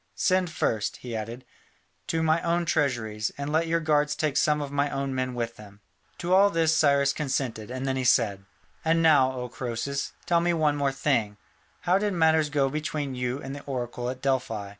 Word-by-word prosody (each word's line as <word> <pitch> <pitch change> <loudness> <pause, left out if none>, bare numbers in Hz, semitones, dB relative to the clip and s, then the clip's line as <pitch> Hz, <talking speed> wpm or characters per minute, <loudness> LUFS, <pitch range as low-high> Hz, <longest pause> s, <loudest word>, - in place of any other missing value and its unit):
Send 185 -1 +2
first," 110 -8 -1
he 120 -2 -7
added, 115 +3 -6 0.6
"to 165 0 0
my 160 +1 +2
own 170 0 0
treasuries, 115 -8 0
and 140 +1 -4
let 160 +2 +1
your 165 +1 +1
guards 150 -2 +1
take 150 -3 -1
some 150 0 +3
of 145 -1 -4
my 145 0 +1
own 135 -1 -3
men 130 -1 -2
with 115 -1 -3
them." 105 -1 -14 0.4
To 175 +1 -1
all 200 +2 +6
this 165 -3 +2
Cyrus 140 -2 +3
consented, 130 -7 -3
and 130 +1 -4
then 135 -1 -1
he 130 - -1
said: 110 -6 +2 0.4
"And 165 0 +2
now, 145 -5 +5
O 125 -1 -5
Croesus, 130 +3 -4
tell 170 -1 +3
me 175 0 +1
one 150 -2 +1
thing 135 -5 +1
more. 105 0 -20 0.4
How 180 +2 +2
did 205 -1 0
matters 160 -3 +3
go 140 -2 +1
between 150 -1 -3
you 125 +2 -3
and 135 - -6
the 145 - -8
oracle 125 -2 -4
at 130 +1 -7
Delphi? 120 -7 -1
140 Hz, 200 wpm, -26 LUFS, 125-160 Hz, 0.6 s, all